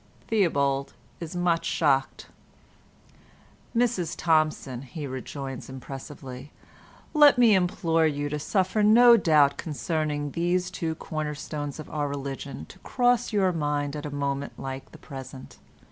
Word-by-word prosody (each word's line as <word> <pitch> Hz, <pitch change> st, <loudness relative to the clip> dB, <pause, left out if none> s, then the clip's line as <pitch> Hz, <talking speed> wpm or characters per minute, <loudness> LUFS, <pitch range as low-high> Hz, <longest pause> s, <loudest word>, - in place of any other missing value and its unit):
Theobald 140 Hz, -10 st, +1 dB, 0.3 s
is 170 Hz, 0 st, -7 dB
much 175 Hz, -2 st, +1 dB
shocked. 135 Hz, -4 st, +1 dB, 1.5 s
"Mrs 225 Hz, -9 st, +1 dB
Thompson," 155 Hz, -6 st, +1 dB
he 140 Hz, +3 st, -7 dB
rejoins 135 Hz, 0 st, -6 dB
impressively, 130 Hz, 0 st, -9 dB, 0.6 s
"let 295 Hz, -3 st, +7 dB
me 235 Hz, -3 st, +6 dB
implore 170 Hz, -3 st, +2 dB
you 145 Hz, -1 st, -2 dB
to 150 Hz, +1 st, -3 dB
suffer 190 Hz, +6 st, 0 dB
no 235 Hz, +3 st, +8 dB
doubt 150 Hz, -8 st, +4 dB
concerning 150 Hz, -2 st, -2 dB
these 180 Hz, +2 st, 0 dB
two 165 Hz, -3 st, -3 dB
cornerstones 150 Hz, -2 st, -5 dB
of 155 Hz, -, -7 dB
our 145 Hz, -1 st, -1 dB
religion 140 Hz, -1 st, -5 dB
to 190 Hz, -, -14 dB
cross 245 Hz, +2 st, +1 dB
your 195 Hz, -3 st, +2 dB
mind 145 Hz, -3 st, -1 dB
at 150 Hz, 0 st, -5 dB
a 145 Hz, -, -6 dB
moment 140 Hz, 0 st, -3 dB
like 135 Hz, 0 st, -7 dB
the -, -, -12 dB
present. 130 Hz, -2 st, -10 dB
150 Hz, 130 wpm, -26 LUFS, 140-180 Hz, 1.5 s, no